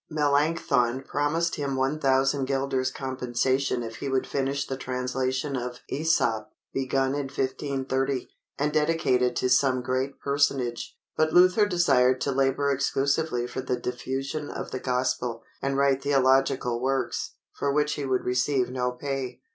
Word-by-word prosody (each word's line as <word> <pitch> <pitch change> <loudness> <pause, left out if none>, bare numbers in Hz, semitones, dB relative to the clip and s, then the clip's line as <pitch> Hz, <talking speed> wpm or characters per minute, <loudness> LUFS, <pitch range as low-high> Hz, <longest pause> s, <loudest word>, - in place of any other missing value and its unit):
_" - - -68
Melanchthon 140 -4 +2
promised 155 +5 0
him 140 -2 -2
1000 135 0 +2
guilders 135 -1 0
compensation 130 0 -1
if 115 -1 -7
he 140 - -4
would 130 -1 +1
finish 140 +1 -1
the 135 - -4
translation 130 +2 -2
of 125 0 -5
Æsop, 120 -8 +1 0.3
begun 135 0 0
in 145 -1 -2
1530, 135 -1 -2 0.3
and 150 +1 0
dedicate 155 -4 +2
it 125 -1 +1
to - - +1
some 130 0 +3
great 130 +2 -2
personage; 140 -4 0 0.2
but 155 0 +1
Luther 185 +4 +6
desired 130 -9 +3
to 140 - 0
labor 135 +1 +1
exclusively 140 -1 0
for 130 - -4
the 130 -1 -1
diffusion 135 +4 -4
of - - -6
the 130 - -3
Gospel, 125 -2 -1 0.2
and 135 0 -1
write 140 -1 +3
theological 135 -3 +2
works, 130 -1 -1 0.2
for 140 - -1
which 150 +1 +1
he 145 - -4
would 130 -2 0
receive 125 +1 +1
no 125 -1 -1
pay. 130 -1 -4
135 Hz, 145 wpm, -26 LUFS, 125-140 Hz, 0.3 s, Luther